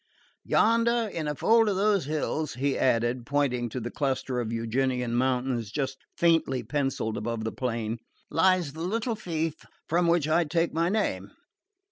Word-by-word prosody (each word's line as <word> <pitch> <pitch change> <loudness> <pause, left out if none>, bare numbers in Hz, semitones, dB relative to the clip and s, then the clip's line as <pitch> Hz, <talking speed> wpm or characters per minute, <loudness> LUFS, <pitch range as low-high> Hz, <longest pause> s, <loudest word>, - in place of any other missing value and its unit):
Yonder, 230 +1 +3
in 155 -2 -3
a 150 - -1
fold 225 - +4
of 200 - 0
those 200 -4 +2
hills," 155 +1 -2
he 135 +2 0
added, 120 0 +1
pointing 125 -2 0
to 125 - -4
the 120 0 -5
cluster 130 -2 -1
of 115 -2 -2
Euganean 125 +1 -1
mountains 125 -3 0
just 135 0 -2 0.2
faintly 165 -7 +2
pencilled 135 -3 -1
above 115 +1 -3
the 110 - -2
plain, 115 -2 -3 0.3
"lies 175 -3 +3
the 160 - -7
little 225 +7 -1
fief 165 -6 -3 0.2
from 170 +2 +2
which 170 -3 +3
I 165 +2 +3
take 165 +2 0
my 165 +2 +1
name. 210 +2 -1
140 Hz, 160 wpm, -27 LUFS, 125-170 Hz, 0.3 s, fold